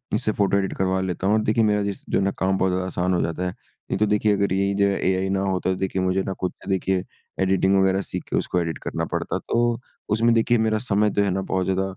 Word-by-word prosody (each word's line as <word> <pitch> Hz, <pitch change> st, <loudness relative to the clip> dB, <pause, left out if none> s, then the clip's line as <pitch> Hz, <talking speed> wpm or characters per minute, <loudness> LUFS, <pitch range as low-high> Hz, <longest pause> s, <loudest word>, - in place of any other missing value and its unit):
इससे 110 Hz, -, +1 dB
photo 100 Hz, -1 st, +2 dB
edit 95 Hz, -1 st, -1 dB
करवा 95 Hz, 0 st, +1 dB
लेता 95 Hz, +1 st, -2 dB
हूँ 105 Hz, -, +4 dB
और 110 Hz, -, +2 dB
देखिए 110 Hz, +2 st, +2 dB
मेरा 105 Hz, -1 st, +2 dB
जिस 100 Hz, -1 st, -4 dB
जो -, -, +2 dB
ना 100 Hz, 0 st, +1 dB
काम 95 Hz, 0 st, +1 dB
बहुत 95 Hz, -1 st, +1 dB
आसान 90 Hz, 0 st, -1 dB
हो 90 Hz, -, +1 dB
जाता 85 Hz, +2 st, -2 dB
है। -, -, -2 dB, 0.4 s
नहीं -, -, +1 dB
तो 105 Hz, -, +4 dB
देखिए 105 Hz, 0 st, +2 dB
अगर 100 Hz, -2 st, +1 dB
यही 100 Hz, +1 st, +1 dB
जो 100 Hz, 0 st, +3 dB
है 100 Hz, -, 0 dB
एआई 95 Hz, 0 st, +1 dB
ना 95 Hz, 0 st, 0 dB
होता 95 Hz, -1 st, -1 dB
तो -, -, 0 dB
देखिए 95 Hz, 0 st, -1 dB
मुझे 95 Hz, +1 st, +1 dB
ना 95 Hz, -, -3 dB
खुद 90 Hz, -1 st, 0 dB
का -, -, -9 dB
देखिए 95 Hz, -1 st, 0 dB, 0.4 s
एडिटिंग 95 Hz, +1 st, +3 dB
वगैरह 95 Hz, 0 st, +2 dB
सीखके -, -, -5 dB
उसको 90 Hz, -, 0 dB
एडिट 80 Hz, -2 st, -3 dB
करना -, -, -2 dB
पड़ता -, -, -1 dB
तो 120 Hz, 0 st, 0 dB, 0.4 s
उसमें 115 Hz, +1 st, +3 dB
देखिए 120 Hz, +1 st, +3 dB
मेरा 110 Hz, -1 st, +1 dB
समय 105 Hz, -2 st, +2 dB
तो 100 Hz, -, +1 dB
है 100 Hz, -, +1 dB
ना 95 Hz, -, -1 dB
बहुत 95 Hz, -1 st, -1 dB
ज़्यादा 95 Hz, 0 st, 0 dB
95 Hz, 260 wpm, -23 LUFS, 95-105 Hz, 0.4 s, हूँ